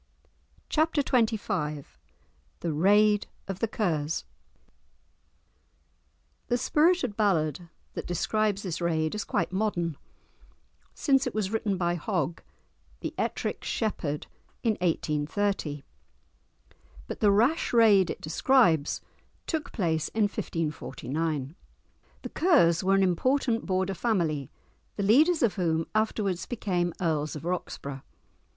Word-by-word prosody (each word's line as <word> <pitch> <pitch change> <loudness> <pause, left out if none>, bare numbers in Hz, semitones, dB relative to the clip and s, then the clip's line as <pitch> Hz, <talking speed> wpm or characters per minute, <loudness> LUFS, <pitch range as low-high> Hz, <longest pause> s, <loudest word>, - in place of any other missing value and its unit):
_"] - - -36 0.6
*Chapter 310 -2 +2
XXV* 200 - 0 0.8
*The 165 -2 -1
Raid 205 +6 +4 0.2
of 195 -1 -4
the 230 - +1
Kers* 165 -8 -1 2.2
The 245 - +1
spirited 300 - +2
ballad 170 -5 0 0.2
that - - -5
describes 205 +3 0
this 180 -3 -4
raid 160 -2 0
is 210 -1 -2
quite 175 -4 -1
modern, 180 -6 -1 1.0
since 270 -2 +2
it 245 - -4
was 205 -3 -1
written 215 -3 0
by 175 -1 +1
Hogg, 170 0 -2 0.6
"the - - -4
Ettrick - - -2
Shepherd," 160 -10 -2 0.4
in 230 - +3
1830. 155 -1 -1 1.2
But - - -6
the 210 - +4
rash 235 +11 +2
raid 215 -6 +5
it - - -5
describes 165 - +3 0.4
took 320 -3 -3
place 160 -7 0
in 220 - 0
1549. 155 -5 -3 0.7
The - - -5
Kers 200 - +3
were 195 +1 +3
an 195 - +4
important 235 +6 +1
Border 190 0 0
family, 170 - 0 0.5
the 200 - -2
leaders 295 - +4
of 220 -3 +2
whom 165 -3 +1
afterwards 215 -4 0
became 180 -7 -1
Earls 155 -4 -1
of 150 - -7
Roxburgh. 145 -6 -4
190 Hz, 115 wpm, -28 LUFS, 160-220 Hz, 2.2 s, raid